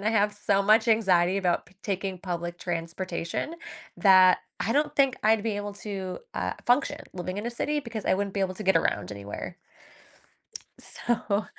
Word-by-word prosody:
and - - -8
I 215 - +3
have 210 -2 +2
so 200 0 +1
much 215 +3 +5
anxiety 190 -5 +3
about 180 -4 0
p 180 - -21
taking 195 -2 -3
public 175 -1 -4
transportation 170 - -3 0.4
that 185 -2 +7 0.2
I 225 - 0
don't 295 +2 +1
think 275 -3 +3
I'd 220 -1 +4
be 215 -3 -1
able 205 0 -4
to, 195 -3 -5
uh, - - -1
function 290 +4 +2
living 185 +1 -4
in 210 - -4
a - - -1
city, 295 +5 -1
because 230 -5 -6
I - - +4
wouldn't 200 0 -2
be 200 - -1
able 190 -1 0
to 215 - -5
get 190 -2 +4
around 165 - 0
anywhere. 100 0 -7 1.2
So 220 -3 -1
200 Hz, 180 wpm, -27 LUFS, 185-220 Hz, 1.2 s, that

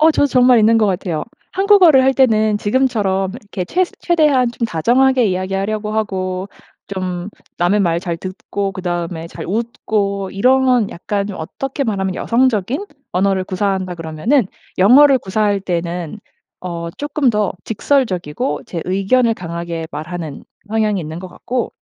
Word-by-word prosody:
어 315 +1 +6
저도 290 - +3
정말 250 -2 +5
있는 225 +1 +5
것 215 - +3
같아요. 180 -4 -2 0.3
한국어를 375 -8 +6
할 265 +1 +4
때는 220 -5 +3
지금처럼 205 -5 +1
이렇게 200 -3 -5
최스 360 - 0
최대한 300 -8 +3
좀 235 -1 -2
다정하게 245 +8 +3
이야기하려고 195 +3 -2
하고 190 -3 -2 0.4
좀 185 -1 -4 0.3
남의 175 +4 +2
말 170 -2 +1
잘 170 -2 -3
듣고 195 +2 -4
그다음에 175 -2 -4
잘 - - -8
웃고 200 -2 -2
이런 250 +1 +3
약간 200 +3 -3
좀 195 - -6
어떻게 270 - -4
말하면 195 -4 -1
여성적인 245 - +1 0.3
언어를 190 +1 +1
구사한다 190 -1 -2
그러면은 170 - 0 0.3
영어를 265 +7 +7
구사할 205 0 0
때는 175 0 -3 0.4
어 170 -2 -5
쪼끔 290 -3 0
더 210 -2 0
직설적이고 185 - -1
제 170 - -5
의견을 220 +6 +2
강하게 170 -2 -5
말하는 155 0 -6 0.3
성향이 215 -2 +1
있는 160 +1 -6
것 185 - -8
같고 245 +7 -4
200 Hz, 325 characters per minute, -18 LUFS, 180-245 Hz, 0.4 s, 영어를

